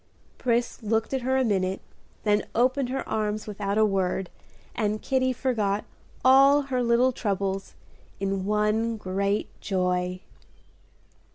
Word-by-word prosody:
Pris 240 Hz, -1 st, 0 dB
looked 225 Hz, +3 st, 0 dB
at 265 Hz, -, 0 dB
her 260 Hz, +2 st, +1 dB
a 265 Hz, -, +3 dB
minute, 190 Hz, -4 st, 0 dB, 0.4 s
then 210 Hz, -1 st, +1 dB
opened 255 Hz, +2 st, +2 dB
her 270 Hz, +1 st, -3 dB
arms 215 Hz, 0 st, -1 dB
without 205 Hz, -1 st, -3 dB
a 220 Hz, -, +5 dB
word, 190 Hz, -2 st, -1 dB, 0.4 s
and 215 Hz, -1 st, -1 dB
Kitty 260 Hz, -1 st, +1 dB
forgot 215 Hz, -6 st, -1 dB, 0.4 s
all 275 Hz, +2 st, +6 dB
her 260 Hz, -2 st, -1 dB
little 240 Hz, +2 st, +3 dB
troubles 195 Hz, -4 st, -2 dB, 0.4 s
in 195 Hz, -1 st, -1 dB
one 210 Hz, +2 st, +1 dB
great 200 Hz, +1 st, -1 dB
joy. 180 Hz, -2 st, -1 dB
215 Hz, 125 wpm, -26 LUFS, 195-250 Hz, 0.4 s, all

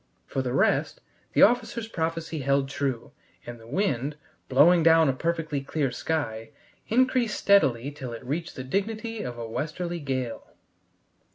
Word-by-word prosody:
For 135 Hz, -, -2 dB
the 125 Hz, -1 st, -3 dB
rest, 130 Hz, -, +1 dB, 0.3 s
the -, -, +6 dB
officer's 235 Hz, 0 st, +2 dB
prophecy 165 Hz, -4 st, -3 dB
held 140 Hz, 0 st, +1 dB
true, 135 Hz, -4 st, -3 dB, 0.3 s
and 120 Hz, -1 st, -8 dB
the 115 Hz, -, -15 dB
wind, 145 Hz, -, -1 dB, 0.3 s
blowing 165 Hz, +7 st, +6 dB
down 165 Hz, -2 st, +5 dB
a -, -, +2 dB
perfectly 160 Hz, 0 st, -2 dB
clear 140 Hz, -1 st, -1 dB
sky, 115 Hz, -6 st, -3 dB, 0.4 s
increased 250 Hz, -2 st, +2 dB
steadily 140 Hz, -10 st, +3 dB
till 135 Hz, -4 st, -7 dB
it 115 Hz, +2 st, -8 dB
reached 160 Hz, +6 st, -3 dB
the 130 Hz, -, -5 dB
dignity 215 Hz, -, -2 dB
of 120 Hz, -1 st, -5 dB
a 115 Hz, -1 st, -5 dB
westerly 165 Hz, +9 st, -3 dB
gale. 130 Hz, -5 st, -4 dB
150 Hz, 150 wpm, -26 LUFS, 130-175 Hz, 0.4 s, the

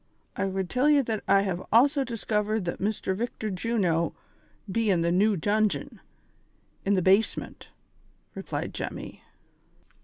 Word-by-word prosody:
I -, -, -1 dB
would 190 Hz, -1 st, -2 dB
tell 250 Hz, +9 st, +1 dB
j 300 Hz, -1 st, +6 dB
e -, -, +5 dB
that 225 Hz, -5 st, -3 dB
I 195 Hz, 0 st, +5 dB
have 185 Hz, -3 st, -2 dB
also 275 Hz, +5 st, +4 dB
diskivered 215 Hz, -3 st, -1 dB
that 170 Hz, -, -3 dB
Mr. 200 Hz, -2 st, -1 dB
Victor 220 Hz, 0 st, -3 dB
Juno 180 Hz, -5 st, 0 dB, 0.6 s
be 225 Hz, +2 st, +1 dB
in 180 Hz, -4 st, +3 dB
the 170 Hz, 0 st, +1 dB
new 200 Hz, +3 st, +3 dB
dungeon, 210 Hz, +4 st, 0 dB, 0.8 s
in 200 Hz, +1 st, +2 dB
the 185 Hz, -, +1 dB
base 195 Hz, +4 st, +4 dB
ment," -, -, -8 dB, 0.6 s
replied -, -, -5 dB
Jemmy. -, -, -6 dB
205 Hz, 150 wpm, -27 LUFS, 190-225 Hz, 0.8 s, j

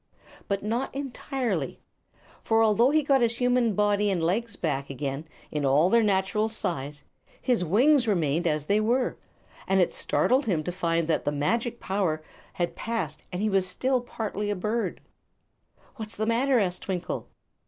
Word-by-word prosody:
But 200 Hz, 0 st, -1 dB
not 235 Hz, +6 st, -2 dB
entirely. 250 Hz, -, -3 dB, 0.6 s
For 225 Hz, 0 st, +3 dB
although 225 Hz, +3 st, +4 dB
he 305 Hz, +1 st, +3 dB
got 275 Hz, -2 st, +3 dB
his 230 Hz, 0 st, +2 dB
human 245 Hz, -3 st, +2 dB
body 205 Hz, 0 st, +2 dB
and 180 Hz, -4 st, 0 dB
legs 205 Hz, +5 st, 0 dB
back 140 Hz, -6 st, -2 dB
again, 140 Hz, +3 st, -4 dB, 0.4 s
all 140 Hz, +4 st, +4 dB
in 185 Hz, -, +2 dB
their 235 Hz, -, +5 dB
natural 210 Hz, +1 st, +1 dB
size, 145 Hz, -9 st, -3 dB, 0.4 s
his 245 Hz, -7 st, +1 dB
wings 250 Hz, -, +4 dB
remained 170 Hz, -4 st, +1 dB
as 150 Hz, -2 st, 0 dB
they 205 Hz, +6 st, +2 dB
were, 240 Hz, +4 st, 0 dB, 0.5 s
and 190 Hz, 0 st, +3 dB
it 180 Hz, -, +2 dB
startled 265 Hz, +1 st, +2 dB
him 165 Hz, -7 st, +1 dB
to 180 Hz, -, -3 dB
find 170 Hz, -2 st, 0 dB
that 165 Hz, -, +1 dB
the 145 Hz, -, 0 dB
magic 230 Hz, -, -1 dB
power 185 Hz, -6 st, -1 dB, 0.3 s
had 175 Hz, -1 st, -2 dB
passed 230 Hz, 0 st, -3 dB
and 180 Hz, +2 st, -3 dB
he 215 Hz, -, +2 dB
was 190 Hz, -1 st, +2 dB
still 255 Hz, +6 st, 0 dB
partly 210 Hz, -3 st, -4 dB
a 205 Hz, -, 0 dB
bird. 215 Hz, +5 st, -2 dB, 1.0 s
"What's 220 Hz, -1 st, -6 dB
the 215 Hz, -, -1 dB
matter?" 250 Hz, +4 st, +2 dB
asked 180 Hz, -5 st, 0 dB
Twinkle. 180 Hz, -2 st, -4 dB
205 Hz, 165 wpm, -27 LUFS, 170-235 Hz, 1.0 s, their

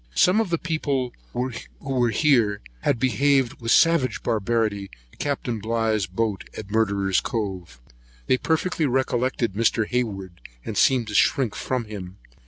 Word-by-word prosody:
Some 190 Hz, +5 st, +4 dB
of 220 Hz, -, -2 dB
the 170 Hz, -, +1 dB
people 145 Hz, -6 st, -2 dB, 0.2 s
were 125 Hz, 0 st, -2 dB
here 115 Hz, -6 st, +2 dB, 0.2 s
who -, -, +3 dB
behaved 130 Hz, +1 st, +1 dB
with 115 Hz, -, -3 dB
such -, -, +8 dB
savage 165 Hz, -6 st, 0 dB
barbarity 110 Hz, -3 st, 0 dB, 0.2 s
to -, -, -22 dB
Capt. 145 Hz, -1 st, -2 dB, 0.2 s
Bligh's 110 Hz, -2 st, 0 dB
boat 105 Hz, +2 st, -2 dB
at 100 Hz, -2 st, -8 dB
Murderer's 100 Hz, -3 st, +1 dB
Cove. 95 Hz, -, -4 dB, 0.5 s
They 130 Hz, -, +3 dB
perfectly 160 Hz, -1 st, 0 dB
recollected 125 Hz, -3 st, 0 dB
Mr. 115 Hz, +1 st, +2 dB
Hayward, 100 Hz, -8 st, -3 dB, 0.2 s
and -, -, -4 dB
seemed 125 Hz, -4 st, +3 dB
to -, -, -6 dB
shrink 120 Hz, +1 st, +3 dB
from 125 Hz, -3 st, -2 dB
him. 100 Hz, -3 st, -8 dB
115 Hz, 145 wpm, -24 LUFS, 105-130 Hz, 0.5 s, such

